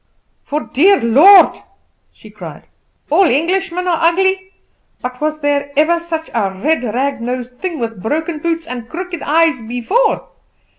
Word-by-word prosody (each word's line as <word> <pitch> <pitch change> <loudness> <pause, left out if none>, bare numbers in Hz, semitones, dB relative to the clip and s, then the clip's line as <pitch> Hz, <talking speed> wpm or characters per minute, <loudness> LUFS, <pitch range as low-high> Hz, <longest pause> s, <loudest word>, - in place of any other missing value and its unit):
"For, 300 +1 -3
dear 385 +9 +4
Lord!" 290 - +6 0.5
she - - -16
cried; - - -10 0.5
"all 370 +5 +4
Englishmen 360 +5 0
are 340 -2 +1
ugly; 380 +3 +1 0.5
but 250 +1 -7
was 305 0 -2
there 285 -1 -1
ever 335 +3 +3
such 330 -1 -5
a 210 -4 0
red 255 +10 -1
rag 255 +3 -2
nosed 250 +1 -5
thing 360 -4 -4
with 225 -6 -5
broken 310 - -2
boots 330 +1 -2
and 245 -3 -7
crooked 350 +1 -6
eyes 320 -3 +2
before? 245 - -1
310 Hz, 145 wpm, -16 LUFS, 250-340 Hz, 0.5 s, Lord